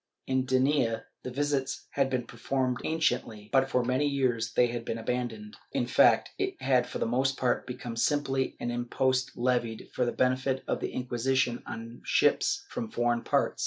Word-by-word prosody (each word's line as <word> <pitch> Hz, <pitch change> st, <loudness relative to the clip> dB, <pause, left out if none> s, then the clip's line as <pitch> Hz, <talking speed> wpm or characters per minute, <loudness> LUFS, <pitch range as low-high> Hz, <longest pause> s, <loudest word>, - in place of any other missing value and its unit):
In 130 Hz, -1 st, +1 dB
Denia 130 Hz, -3 st, +2 dB, 0.2 s
the -, -, -5 dB
visits 135 Hz, 0 st, -1 dB
had 135 Hz, -1 st, +1 dB
been 125 Hz, -2 st, -1 dB
performed 130 Hz, 0 st, -1 dB
anciently, 115 Hz, -9 st, -1 dB
but 135 Hz, 0 st, +4 dB
for 125 Hz, -2 st, +2 dB
many 130 Hz, +4 st, +2 dB
years 125 Hz, -5 st, 0 dB
they 125 Hz, -, +5 dB
had 120 Hz, -1 st, -3 dB
been 115 Hz, -, -3 dB
abandoned.^ 115 Hz, -3 st, -3 dB, 0.2 s
In -, -, +1 dB
fact, -, -, +4 dB
it -, -, -2 dB
had 130 Hz, -2 st, +2 dB
for -, -, -5 dB
the -, -, 0 dB
most 130 Hz, +3 st, +1 dB
part 125 Hz, -1 st, 0 dB
become 125 Hz, -2 st, -6 dB
simply 135 Hz, +1 st, 0 dB
an 120 Hz, -, -2 dB
impost 130 Hz, +2 st, 0 dB
levied 120 Hz, -2 st, 0 dB
for 125 Hz, -, +1 dB
the 120 Hz, -, +1 dB
benefit 130 Hz, +1 st, +1 dB
of -, -, 0 dB
the -, -, -3 dB
Inquisition 125 Hz, 0 st, 0 dB
on 115 Hz, +1 st, -7 dB
ships -, -, +2 dB
from 115 Hz, -, -5 dB
foreign 120 Hz, 0 st, +1 dB
parts. -, -, +1 dB
125 Hz, 175 wpm, -29 LUFS, 120-135 Hz, 0.2 s, they